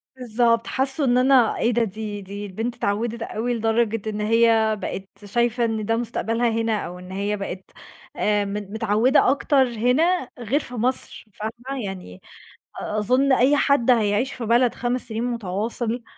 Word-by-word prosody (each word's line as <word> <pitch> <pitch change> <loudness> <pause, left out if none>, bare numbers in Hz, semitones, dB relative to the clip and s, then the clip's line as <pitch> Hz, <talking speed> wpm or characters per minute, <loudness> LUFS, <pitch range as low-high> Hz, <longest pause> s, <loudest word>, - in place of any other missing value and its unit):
بالضبط، 235 -2 +1
حسّوا 270 +2 0
إن 245 -1 +3
أنا 255 -3 +4
إيه 235 - +1
ده، 235 0 +2
دي 210 0 -5
دي 200 +2 -7
البنت 225 +5 -4
اتعوّدِت 230 +1 -2
أوي 230 +2 -2
لدرجة 225 -1 0
إن 210 0 -4
هي 225 0 +3
بقت 195 +2 -7
شايفة 235 +3 +1
إن 220 -2 -2
ده 225 +1 +1
مستقبلها 230 0 -1
هنا، 225 -1 0
أو 180 +1 -8
إن 180 +1 -11
هي 200 +2 -2
بقت 190 -1 -7 0.4
آآ، 205 -1 +1
م 200 - -5
متعودة 215 +6 +2
أكتر 275 0 +3
هنا 250 +7 +1
غير 245 +5 0
في 250 - -9
مصر، 250 +2 -2
فاهمة؟ 240 +4 -5
يعني 180 - -8 0.6
أ 210 - -3
أظن 255 +6 +2
أي 270 +4 +4
حد 275 -3 +3
هيَعيش 225 +2 +1
في 235 - -5
بلد 240 +2 +3
5 245 +1 -1
سنين 225 +1 -3
مُتَواصل، 230 +1 -2
230 Hz, 165 wpm, -23 LUFS, 210-245 Hz, 0.6 s, أنا